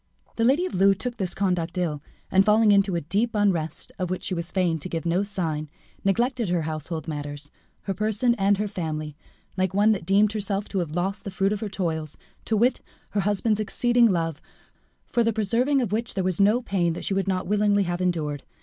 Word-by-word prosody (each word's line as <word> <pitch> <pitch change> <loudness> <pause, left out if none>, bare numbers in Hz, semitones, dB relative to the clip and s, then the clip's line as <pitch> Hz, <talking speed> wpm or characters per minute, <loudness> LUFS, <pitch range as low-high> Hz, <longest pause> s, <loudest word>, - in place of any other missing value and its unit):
The 230 - 0
lady 285 +9 +3
of - - -4
Loué 195 +1 +4
took 245 +2 -4
this 185 -4 -2
conduct 180 -3 -1
ill, 155 -5 -1 0.3
and 190 +1 +5
falling 215 +1 +5
into 200 -2 +3
a 170 - 0
deep 210 +10 0
unrest, 185 -7 0
of 180 -1 -1
which 185 - -3
she - - -2
was 170 -1 -3
fain 180 -4 0
to 185 - -6
give 165 -1 -3
no 170 +3 +2
sign, 165 -7 -3 0.3
neglected 235 +2 +1
her 175 -2 +1
household 155 0 -4
matters, 145 -1 -5 0.3
her 195 - -2
person 215 +4 +1
and 200 +1 +3
her 210 +1 -1
family, 155 -6 -4 0.4
like 185 0 0
one 210 +2 +5
that 190 -6 -2
deemed 205 +2 +4
herself 205 -1 -2
to 195 - -1
have 165 -3 -3
lost 195 +3 -2
the - - -5
fruit 195 +1 0
of 210 - -3
her 215 - -4
toils, 160 -6 -3 0.3
to 220 - +1
wit, 245 +4 +2 0.3
her 205 - 0
husband's 210 +2 +1
exceeding 240 +2 +3
love, 165 -4 -1 0.6
for 240 - +1
the 230 - +2
preserving 235 +6 +1
of 215 - -3
which 225 +2 -2
there 190 - 0
was 185 +1 0
no 215 +5 +4
pain 180 -6 0
that - - -5
she - - 0
would 195 0 0
not 185 -1 0
willingly 205 0 +2
have 175 0 -2
endured. 155 -6 -1
195 Hz, 215 wpm, -25 LUFS, 170-210 Hz, 0.6 s, and